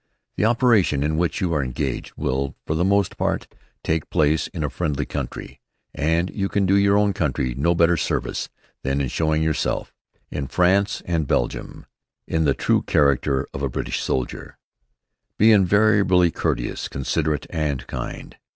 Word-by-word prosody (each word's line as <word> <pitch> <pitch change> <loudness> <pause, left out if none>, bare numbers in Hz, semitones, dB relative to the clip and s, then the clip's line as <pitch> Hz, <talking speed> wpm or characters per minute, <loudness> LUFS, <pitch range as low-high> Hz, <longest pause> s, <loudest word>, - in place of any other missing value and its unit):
The - - +1
operations 110 - +3
in 80 +1 0
which 85 +5 -1
you 90 -3 0
are 75 -3 +1
engaged 65 +1 -3
will, 70 +1 -2
for - - -1
the 80 +2 +1
most 100 0 +1
part, - - 0 0.4
take 80 -1 -1
place 75 +1 +2
in 80 -4 -5
a 75 - -1
friendly 75 -3 -2
country, - - -6 0.3
and 80 +4 0
you 100 -2 -2
can 100 -1 +1
do 95 - +2
your 100 0 +4
own 105 -1 +2
country 65 -6 -1
no 80 +7 +1
better 85 +1 +4
service 75 - -2 0.3
than 70 +1 -1
in 70 -3 -1
showing 80 +3 0
yourself, 80 -1 -1 0.4
in 70 -2 -3
France 95 +5 +2
and 80 -4 -1
Belgium, - - -2 0.4
in 80 -1 0
the 70 - +2
true - - +2
character 70 -1 +2
of 65 - -5
a 70 - 0
British - - -3
soldier. 65 -2 -3 0.8
Be 110 +2 +6
invariably 100 -3 +4
courteous, - - -2
considerate, 75 +2 -1
and 75 -6 -2
kind. - - -7
80 Hz, 160 wpm, -22 LUFS, 70-95 Hz, 0.8 s, Be